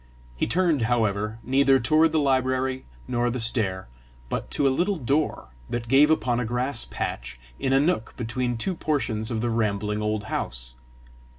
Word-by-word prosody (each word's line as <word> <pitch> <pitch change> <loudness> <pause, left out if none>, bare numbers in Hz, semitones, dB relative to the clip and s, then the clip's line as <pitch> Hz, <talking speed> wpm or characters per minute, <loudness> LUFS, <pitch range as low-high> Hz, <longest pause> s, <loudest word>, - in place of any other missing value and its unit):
He - - -1
turned, 165 0 +2
however, 110 -2 0
neither 135 +1 +4
toward 155 +5 +3
the 160 - +1
library 130 -2 +1 0.2
nor 120 0 0
the 125 +2 -3
stair, 110 -5 0 0.4
but - - -3
to 140 - +1
a 135 - +3
little 195 +6 +1
door 140 - -1 0.2
that 120 -1 -3
gave 135 +5 +5
upon 125 -6 +2
a - - 0
grass 125 +2 -1
patch 60 +1 -5 0.2
in 130 - 0
a 135 - +5
nook 145 -6 0
between 120 +1 -2
two 185 +12 -2
portions 130 -10 -1
of 115 -3 -2
the 120 0 0
rambling 105 -1 -1
old 105 0 -1
house. 65 - -4
120 Hz, 170 wpm, -25 LUFS, 110-140 Hz, 0.4 s, gave